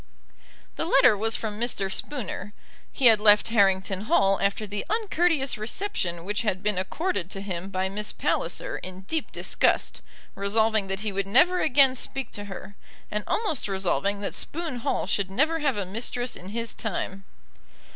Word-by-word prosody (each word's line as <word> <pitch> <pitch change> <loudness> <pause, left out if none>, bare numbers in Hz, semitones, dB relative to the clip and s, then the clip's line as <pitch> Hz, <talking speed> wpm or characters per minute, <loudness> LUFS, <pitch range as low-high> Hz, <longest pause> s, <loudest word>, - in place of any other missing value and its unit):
The - - -1
letter 275 -9 +6
was 225 +2 +1
from 215 -1 -4
Mr. 215 -5 -1
Spooner. 210 -7 -3 0.4
He 270 - -1
had 225 -3 +7
left 210 +1 +6
Harrington 195 -2 +2
Hall 195 - +3
after 200 +2 0
the 205 0 -4
uncourteous 350 - +1
reception 215 - -2
which 205 +1 -1
had 195 -3 -1
been 210 -3 +1
accorded 190 - -2
to 195 - -4
him 190 -2 -5
by 190 -1 -1
Miss 210 +2 -4
Palliser - - -2
in 185 0 -9
deep 305 +11 -3
disgust, - - 0 0.3
resolving 215 +1 +1
that 195 +1 -3
he 215 -1 -2
would 195 0 -2
never 345 - +4
again 270 -2 +5
speak 265 0 -2
to 205 - -7
her, 200 +1 -9 0.4
and 210 0 -2
almost 410 - -1
resolving 195 +1 0
that 200 - -2
Spoon 325 -5 -1
Hall 235 - -1
should 195 0 0
never 310 +11 +1
have 275 -7 0
a 200 - -1
mistress 240 +5 -3
in 185 - -9
his 230 +1 -3
time. 195 -2 -4
210 Hz, 165 wpm, -26 LUFS, 195-260 Hz, 0.4 s, had